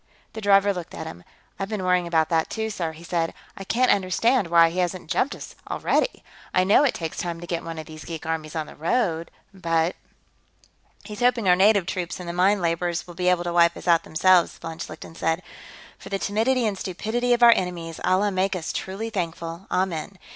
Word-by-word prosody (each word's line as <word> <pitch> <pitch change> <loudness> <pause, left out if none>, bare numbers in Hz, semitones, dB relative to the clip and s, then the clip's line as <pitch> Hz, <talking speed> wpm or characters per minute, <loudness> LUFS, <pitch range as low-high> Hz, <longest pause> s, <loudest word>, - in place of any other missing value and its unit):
The 220 - -6
driver 200 0 +4
looked 180 -3 -7
at - - -6
him. 85 +1 -9 0.4
"I've 195 0 -3
been 210 -4 -3
worrying 180 -1 +2
about 160 -2 +2
that, 165 -1 +1
too, 220 0 -3
sir," 170 -5 -3
he 160 +2 -13
said. 165 -1 -1 0.2
"I 195 - -7
can't 250 +6 +2
understand 200 +4 +2
why 165 -1 +5
he 180 - -3
hasn't 175 -2 -2
jumped 280 - +1
us, - - -10 0.2
already. - - 0 0.3
I 185 - +5
know 200 +9 +5
it 280 - +2
takes 165 -2 -5
time 170 -1 -3
to 175 - -8
get 170 -1 -3
one 165 -1 -6
of 155 - -6
these 155 -1 -10
geek 165 -2 -7
armies 160 -1 -3
on 155 -1 -2
the - - -12
road, 165 -1 0 0.2
but...." 165 -2 0 1.1
"He's 210 0 -8
hoping 245 -4 +2
our 180 - +7
native 200 0 +4
troops 180 -1 -4
and 180 - -7
the 170 - -3
mine 190 +2 +3
laborers 170 +1 -1
will 175 - -11
be 180 +1 -2
able 180 -1 +2
to 175 -1 -3
wipe 170 0 +4
us - - -10
out, 170 -1 +5
themselves," 180 +2 +3
von 165 0 -8
Schlichten 155 +1 -8
said. 165 +2 -1 0.6
"For - - -10
the 195 - -1
timidity 225 +6 +1
and 210 -2 0
stupidity 220 +7 -2
of 240 0 +2
our 235 -1 +10
enemies, 170 -3 -4
Allah 200 +2 +2
make 190 +1 0
us 165 -3 -4
truly 210 +4 -4
thankful, 170 -1 -4
amen. 185 0 -2
180 Hz, 215 wpm, -24 LUFS, 165-200 Hz, 1.1 s, our